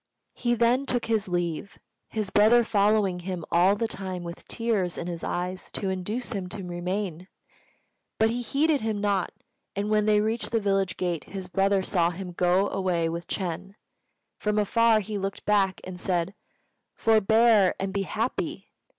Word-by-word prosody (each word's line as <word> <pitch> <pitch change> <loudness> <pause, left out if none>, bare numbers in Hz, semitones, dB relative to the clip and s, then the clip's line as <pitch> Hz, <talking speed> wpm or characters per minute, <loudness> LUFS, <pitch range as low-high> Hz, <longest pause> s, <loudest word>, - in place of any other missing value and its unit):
He 240 0 0
then 240 +4 +2
took 245 -2 0
his 220 -3 0
leave, 175 +1 -2 0.3
his 215 -3 -3
brother 225 +3 +6
following 205 -4 +2
him 175 -2 -5
all 180 +4 +5
the 225 +2 -1
time 190 -4 -4
with 170 0 -8
tears 215 -7 -1
in - - -4
his 170 -1 -5
eyes 180 +1 -3
to 195 -2 -1
induce 210 +8 -3
him 195 -5 -3
to 195 +1 -5
remain. 180 0 -3 0.9
But 220 0 +3
he 245 +1 -2
heeded 285 +5 +1
him 220 -2 -1
not; 200 -2 0 0.4
and 205 +2 -2
when 215 0 +3
they 210 -1 +5
reached 220 +2 -1
the 230 - +1
village 195 -2 0
gate 175 -4 -2
his 190 -1 -7
brother 195 +1 +2
saw 175 -3 +2
him 180 +1 -6
go 180 +3 +2
away 175 -4 0
with 170 +1 -5
Ch'êng. 190 +1 -3 0.6
From 210 0 0
afar 220 +1 +4
he 210 +1 -4
looked 195 0 -4
back 195 -3 +2
and 185 -1 -8
said, 180 0 -1 0.6
"Forbear, 220 -2 +4
and 195 0 -2
be 200 - 0
happy!" 220 +5 -3
195 Hz, 170 wpm, -26 LUFS, 180-220 Hz, 0.9 s, brother